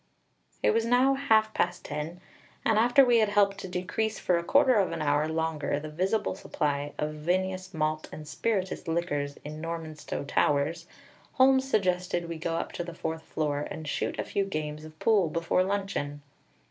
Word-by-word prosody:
It - - +5
was 225 0 +2
now 250 +3 +4
half 220 -6 +3
past - - -1
ten, 150 +4 -5 0.4
and 220 -1 +4
after 245 +4 +6
we 240 -2 +5
had 215 -2 +3
helped 200 -1 +3
to - - -6
decrease 185 +5 -2
for 180 - +1
a - - -5
quarter 265 +6 +5
of 200 -5 +2
an - - -3
hour 150 0 +2
longer 160 -2 -1
the 155 +1 -7
visible 190 +7 0
supply 145 -2 -2
of 150 0 -2
vinous, 185 +4 -1
malt, 155 -1 -1
and 155 -1 -9
spirituous 190 0 -2
liquors 145 -4 -1
in 155 +1 -6
Normanstow 160 -3 -5
Towers, 150 +5 +1 0.5
Holmes 265 0 +4
suggested 180 -5 +1
we 165 -1 -5
go 165 0 -2
up - - -3
to 175 - -4
the 170 -1 -8
fourth 160 0 -3
floor 150 -2 -2
and 155 - -7
shoot - - -2
a - - -1
few 200 - -1
games 155 -4 -4
of 155 0 -13
pool 200 -5 +3
before 165 +3 +1
luncheon. 190 -7 -2
170 Hz, 180 wpm, -28 LUFS, 155-205 Hz, 0.5 s, after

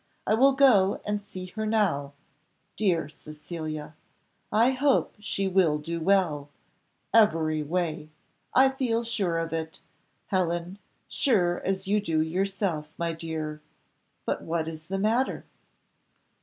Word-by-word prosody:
I - - +2
will 270 +5 +5
go 235 -9 +5
and 210 0 -1
see 185 -2 -8
her 215 +4 -5
now; 175 -11 +1 0.6
dear 175 -8 +1
Cecilia! 155 0 -7 0.6
I 230 +5 +4
hope 265 +1 +2
she 195 -1 -2
will 180 -5 +3
do 165 +3 -4
well 165 -5 +1 0.6
every 165 -9 +4
way 155 -1 -2 0.4
I 265 +1 +6
feel 250 -3 -1
sure 200 -7 -1
of 165 -1 -2
it, 160 0 -4 0.4
Helen 175 0 -1 0.3
sure 180 -9 +2
as 190 0 -2
you 210 +1 +2
do 165 -5 0
yourself, 180 -1 -1
my 170 -1 -1
dear 160 -2 -5 0.6
But - - -1
what 165 -1 -2
is 160 0 -7
the 195 - -2
matter?" 225 +6 0
180 Hz, 130 wpm, -27 LUFS, 160-210 Hz, 0.6 s, I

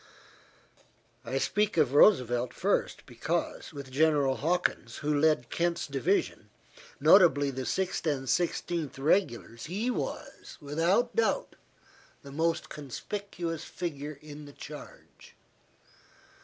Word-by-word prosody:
I 130 +2 -2
speak 200 +9 0
of 145 -5 +3
Roosevelt 125 - +4
first - - 0
because, - - -3
with 140 -2 -9
General 145 -2 +3
Hawkins, 175 +5 -1
who 150 - +2
led 150 -5 +2
Kent's 170 0 0
division, 145 +8 -1 0.5
notably 145 -7 +6
the 130 -1 -5
Sixth 185 -3 -1
and 135 -3 -1
Sixteenth 170 0 -1
Regulars, 135 - 0
he 210 +9 -1
was, - - -6
without 165 - +1
doubt, 470 +2 0 0.7
the 140 - -10
most 165 +3 0
conspicuous 165 - -5
figure 150 -4 -5
in 150 0 -10
the 145 - -12
charge. - - -12
150 Hz, 110 wpm, -29 LUFS, 135-175 Hz, 0.7 s, notably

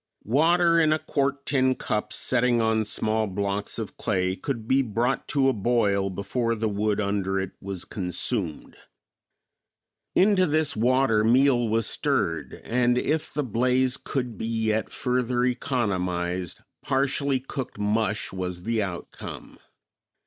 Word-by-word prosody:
Water 170 - +4
in 155 -1 +4
a 155 - +3
quart 140 -2 -1
tin 130 -2 +2
cup 105 -3 -2
setting 125 -1 +2
on 110 -1 +1
small 110 +1 0
blocks 100 +1 -2
of 110 -3 -6
clay 95 -3 0
could 115 -1 -4
be 135 +2 +4
brought 120 +2 -1
to 135 -2 +2
a 135 - +3
boil 100 -3 +1
before 115 +5 -1
the 110 0 -1
wood 105 0 0
under 100 -1 0
it 95 -1 -3
was 95 -2 -5
consumed. 90 -1 -2 1.4
Into 190 -1 +4
this 155 0 +1
water 120 -1 +3
meal 120 +1 +4
was 110 0 +1
stirred 80 -5 -1
and, 120 +1 +2
if 150 +4 0
the 150 - -1
blaze 125 +2 +1
could 125 -5 -4
be 110 - -3
yet 110 -1 0
further 125 -1 0
economized, 90 - -1 0.2
partially 135 0 0
cooked 135 -2 -6
mush 105 +1 0
was 90 -1 -4
the 115 +1 0
outcome. 95 -4 -7
115 Hz, 135 wpm, -25 LUFS, 100-130 Hz, 1.4 s, Water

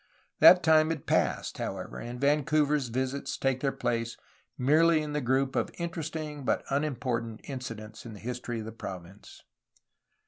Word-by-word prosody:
That 180 0 +9
time 155 -1 +5
had 160 -3 -3
passed, - - 0
however, - - -5
and 120 +1 -6
Vancouver's 150 0 +2
visits 130 +3 -2
take 135 -1 0
their 135 0 0
place 115 -3 -2 0.4
merely 155 +5 +4
in 150 -1 -5
the 150 - 0
group 130 +1 +1
of - - +1
interesting 160 -3 -4
but - - 0
unimportant 125 -6 -1
incidents 115 -5 -7
in 115 - -9
the - - -11
history 125 0 -4
of 110 - -5
the 110 - -6
province. 95 -2 -9
135 Hz, 150 wpm, -29 LUFS, 120-150 Hz, 0.4 s, That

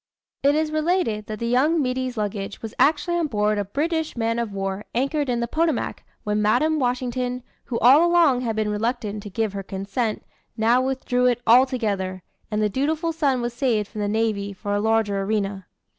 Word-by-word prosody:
It 280 +1 +3
is 310 0 0
related 310 - 0
that 215 - -5
the 235 - -4
young 270 +8 +2
middy's 255 -2 -2
luggage 205 -1 -4
was 225 0 -6
actually 315 +4 +3
on 335 -2 0
board 210 -4 0
a - - 0
British 315 - -2
man 230 0 0
of 230 -3 -2
war 195 0 -3
anchored 275 +3 0
in 240 -1 0
the 235 - -1
Potomac, 320 +1 -1 0.2
when 210 0 0
Madam 280 +9 +2
Washington, 250 0 -1 0.2
who 235 - -3
all 270 +8 +6
along 330 -8 +4
had 230 -3 -2
been 215 -1 0
reluctant 210 -1 -2
to 205 - -8
give 220 0 -2
her 200 - -4
consent, 200 +4 -3 0.3
now 230 +3 +3
withdrew 255 -1 0
it 245 -1 +2
altogether; 220 -7 +2 0.3
and 215 -1 0
the - - +3
"dutiful 310 - -1
son" 280 -6 +1
was 240 0 -3
saved 235 -5 0
from 215 -1 -6
the 205 - 0
navy 205 -2 -1
for 205 +1 -4
a 205 - +1
larger 220 -2 +1
arena. 200 -2 -2
235 Hz, 190 wpm, -23 LUFS, 210-270 Hz, 0.3 s, all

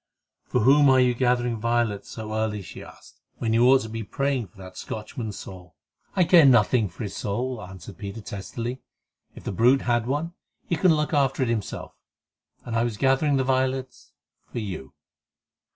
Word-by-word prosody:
"For - - 0
whom 140 +4 +6
are 130 -1 +6
you 125 -1 +4
gathering 120 -1 +1
violets 115 -2 0
so 110 -1 -6
early," 110 -2 -1
she 85 - -10
asked, - - -15 0.2
"when 115 -1 -1
you 120 +2 +5
ought 135 0 +6
to 110 - -6
be 115 +1 -5
praying 135 +2 -1
for 100 - -25
that 95 -1 -11
Scotchman's 110 -1 -6
soul?" 90 -2 -11 0.4
"I 185 - +4
care 170 -1 +7
nothing 115 -4 +4
for 85 - -8
his 100 - -5
soul," 120 +4 -3
answered 95 0 -11
Peter 100 +2 -6
testily. 115 +6 -6 0.5
"If - - -11
the - - -3
brute 125 +7 +3
had 120 -1 +1
one, 150 +6 -2 0.3
he 170 - 0
can 165 0 +4
look 150 +1 -1
after 135 -2 +2
it 125 - -1
himself; 110 -4 -3 0.7
and 115 - -4
I 115 - +2
was 120 -3 -2
gathering 135 +3 +2
the 130 - +2
violets—for 130 -1 -4
you." 95 - -6
120 Hz, 180 wpm, -25 LUFS, 105-130 Hz, 0.7 s, care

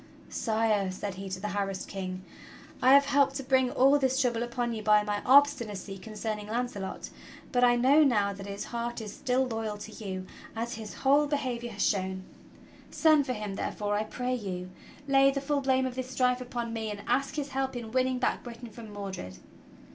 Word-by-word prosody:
"Sire," 215 -3 +1
said 190 +1 -4
he 195 +1 -7
to 185 0 -4
the 210 +2 -3
harassed 195 -2 -2
King, 185 -1 -5 0.6
"I 260 +2 +7
have 280 0 +6
helped 280 -1 +3
to 275 - -3
bring 260 -1 +3
all 275 +4 +4
this 265 -1 +1
trouble 240 -4 +1
upon 240 0 -2
you 220 - -4
by 210 0 +4
my 205 0 -2
obstinacy 235 -8 +3
concerning 215 0 -5
Launcelot, 225 -4 -4 0.4
but 250 0 +2
I 245 -1 +6
know 270 +6 +5
now 205 -7 +2
that 195 0 -9
his 200 0 -5
heart 235 0 -4
is 210 -2 -7
still 260 0 +1
loyal 225 -3 -3
to 215 +1 -9
you 190 -4 -6 0.3
as 230 +1 -3
his 220 -2 -7
whole 285 +2 +3
be 290 - +1
havior 240 -3 -3
has 200 - 0
shown. 190 -1 -1 0.7
Send 310 -4 +4
for 255 - 0
him, 210 -3 -4
therefore, 205 +1 -2
I 210 - +1
pray 250 +3 -3
you; 185 -6 -4 0.4
lay 275 0 +5
the 275 0 -1
full 280 +1 0
blame 265 -1 +2
of 260 - -3
this 255 0 -5
strife 250 -1 +1
upon 240 -2 -4
me; 220 -1 -3
and 205 -1 -6
ask 275 0 0
his 290 -2 -3
help 265 -1 -2
in 230 -2 -6
winning 255 +1 +1
back 250 - 0
Bri 240 -1 -8
tain 235 -1 -10
from 220 0 -10
Mordred." 195 - -6
235 Hz, 205 wpm, -29 LUFS, 205-260 Hz, 0.7 s, I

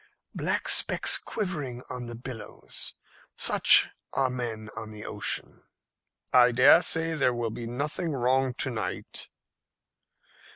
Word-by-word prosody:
"Black - - -2
specks - - +5
quivering 150 - -5
on 125 -1 -7
the 120 - -7
billows 115 -3 -6 0.4
such - - +6 0.3
are 130 -2 +1
men 115 -4 -6
on 110 -1 -7
the 105 -1 -10
ocean." - - -4 0.7
"I 125 -1 +6
dare 130 +7 +6
say 165 -1 0
there 135 -5 0
will 120 -2 -3
be 115 +1 -7
nothing 150 +7 -3
wrong 130 0 0
to 130 - +1
night." 110 - -5
125 Hz, 125 wpm, -27 LUFS, 120-135 Hz, 0.7 s, such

